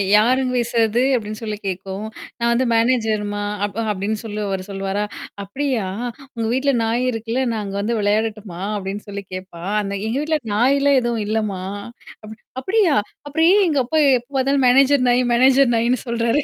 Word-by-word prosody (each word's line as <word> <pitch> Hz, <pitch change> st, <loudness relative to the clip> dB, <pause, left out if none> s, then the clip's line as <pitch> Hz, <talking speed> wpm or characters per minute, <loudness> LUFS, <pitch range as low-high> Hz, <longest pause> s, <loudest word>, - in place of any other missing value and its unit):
யாருங்க 255 Hz, +4 st, +3 dB
பேசுறது 235 Hz, 0 st, +1 dB
அப்டின்னு 215 Hz, -1 st, -4 dB
சொல்லி 215 Hz, -2 st, -4 dB
கேட்கும். 190 Hz, +2 st, -4 dB, 0.3 s
நான் 235 Hz, 0 st, +2 dB
வந்து 255 Hz, +2 st, +1 dB
மேனேஜர்மா 220 Hz, -3 st, +1 dB, 0.2 s
அ -, -, -11 dB
அப் 205 Hz, +1 st, -7 dB
அப்படின்னு 205 Hz, +2 st, -2 dB
சொல்லி 215 Hz, -1 st, -5 dB
அவரு 190 Hz, -1 st, -2 dB
சொல்வாரா? 195 Hz, +1 st, -2 dB, 0.4 s
அப்படியா? 250 Hz, 0 st, -2 dB, 0.5 s
உங்க 225 Hz, -1 st, -2 dB
வீட்ல 275 Hz, +1 st, +2 dB
நாய் 235 Hz, +3 st, 0 dB
இருக்குல்ல, 230 Hz, +3 st, -2 dB
நான் 215 Hz, -2 st, -2 dB
அங்க 195 Hz, 0 st, -5 dB
வந்து 230 Hz, +2 st, -1 dB
விளையாடட்டுமா? 210 Hz, -3 st, -1 dB, 0.2 s
அப்படின்னு 195 Hz, +1 st, -5 dB
சொல்லி 200 Hz, 0 st, -6 dB
கேப்பா. 185 Hz, -2 st, -8 dB, 0.2 s
அந்த 200 Hz, 0 st, -4 dB
எங்க 235 Hz, +4 st, -1 dB
வீட்ல 310 Hz, 0 st, 0 dB
நாய்லாம் 275 Hz, +4 st, +4 dB
எதுவும் 235 Hz, -3 st, -1 dB
இல்லம்மா? 215 Hz, -3 st, -1 dB, 0.6 s
அப 215 Hz, -, -10 dB, 0.3 s
அப்படியா? 380 Hz, -1 st, +2 dB, 0.3 s
அப்புறம் 320 Hz, +3 st, +2 dB
ஏன் 405 Hz, -1 st, +5 dB
எங்க 290 Hz, -4 st, +1 dB
அப்பா 315 Hz, +5 st, +1 dB, 0.2 s
எப்ப 240 Hz, +3 st, -21 dB
பாத்தாலும் 270 Hz, 0 st, +2 dB
மேனேஜர் 270 Hz, +1 st, +5 dB
நாய், 245 Hz, +1 st, +3 dB
மேனேஜர் 260 Hz, 0 st, +5 dB
நாயின்னு 235 Hz, +2 st, +2 dB
சொல்றாரு 235 Hz, +4 st, +1 dB
230 Hz, 165 wpm, -20 LUFS, 205-260 Hz, 0.6 s, ஏன்